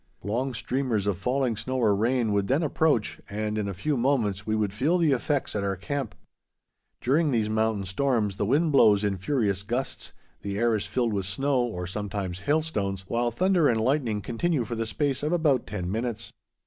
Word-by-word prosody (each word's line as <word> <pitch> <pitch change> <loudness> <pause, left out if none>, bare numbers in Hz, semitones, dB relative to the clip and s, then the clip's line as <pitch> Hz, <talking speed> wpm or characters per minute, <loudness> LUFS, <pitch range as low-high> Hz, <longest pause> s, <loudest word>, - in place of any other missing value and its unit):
Long 120 +6 -1
streamers 125 -5 -1
of 100 -3 -1
falling 125 +1 0
snow 130 +5 -3
or 110 -5 +3
rain 115 +1 +1
would 100 -1 +1
then 140 +6 +2
approach, 150 -6 +1
and 105 +1 -2
in 105 -2 -1
a 100 - -3
few 150 +11 -1
moments 115 -7 0
we 110 - +1
would 105 -3 0
feel 145 - +2
the 165 -4 +3
effects 135 0 0
at 100 - -1
our 100 -1 0
camp. 130 +6 -4 0.9
During 150 +5 +2
these 110 -5 +1
mountain 110 -2 0
storms 105 -1 0
the 100 - 0
wind 150 +6 +2
blows 105 -7 +5
in 100 -2 0
furious 100 -3 0
gusts, 125 +6 -3 0.3
the 100 0 -4
air 115 +1 +2
is 105 - -1
filled 120 -3 0
with 100 -2 -2
snow 135 +7 0
or 110 -8 -3
sometimes 95 -1 -4
hailstones, 120 - -1
while 120 +3 0
thunder 175 - +2
and 115 -2 +2
lightning 115 -4 0
continue 130 +2 0
for 120 - -5
the 115 -1 -2
space 140 +3 -1
of 150 +2 -1
about 150 -7 +2
ten 90 -4 -4
minutes. 115 +1 -3
115 Hz, 195 wpm, -26 LUFS, 100-135 Hz, 0.9 s, blows